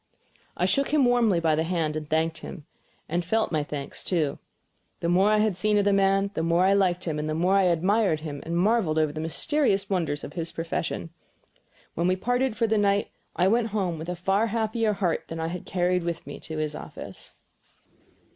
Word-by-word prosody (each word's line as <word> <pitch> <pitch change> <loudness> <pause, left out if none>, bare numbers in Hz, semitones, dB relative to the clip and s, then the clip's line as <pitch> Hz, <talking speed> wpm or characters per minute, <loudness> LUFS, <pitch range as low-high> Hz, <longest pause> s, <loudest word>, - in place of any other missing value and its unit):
I - - +1
shook 275 0 +2
him 295 -3 +3
warmly 235 -7 +3
by 165 -2 +2
the 155 - +1
hand 165 -3 -1
and 155 -1 -5
thanked 160 +1 0
him; 155 -6 -9 0.4
and 175 +2 0
I - - -12
FELT 220 +3 +1
my 155 -2 +1
thanks, 145 -1 -6
too. 155 -6 0 0.6
The 170 - -1
more 190 +4 +4
I 215 - +4
had 210 -2 +2
seen 210 +3 +1
of 205 - +2
the 200 - +3
man 195 0 +2
the 160 - -2
more 170 +2 +2
I 195 - +4
liked 185 -2 +2
him 155 -4 -2
and 150 +1 -2
the 155 - -1
more 180 +4 +2
I 195 -1 +4
admired 180 0 +2
him 145 -3 -6
and 170 +1 -2
marveled 190 -4 +2
over 155 -1 +2
the 155 - -4
mysterious 200 - 0
wonders 160 -6 -1
of 145 - -7
his 165 -1 -4
profession. 165 0 -3 0.8
Then 170 +2 +1
we 185 - +3
parted 245 +4 0
for 230 - +2
the 220 -1 +2
night, 200 0 +1 0.2
and 180 - +2
I - - +5
went 225 +3 +2
home 190 -6 -2
with 160 +2 -6
a 180 - -2
far 195 +5 +1
happier 220 0 0
heart 180 -4 -1
than 165 - -6
I 160 0 -2
had 180 0 -6
carried 180 0 +1
with 170 -1 -4
me - - -8
to 160 -1 -7
his 155 -1 -2
office. - - -7
180 Hz, 220 wpm, -26 LUFS, 160-210 Hz, 0.8 s, I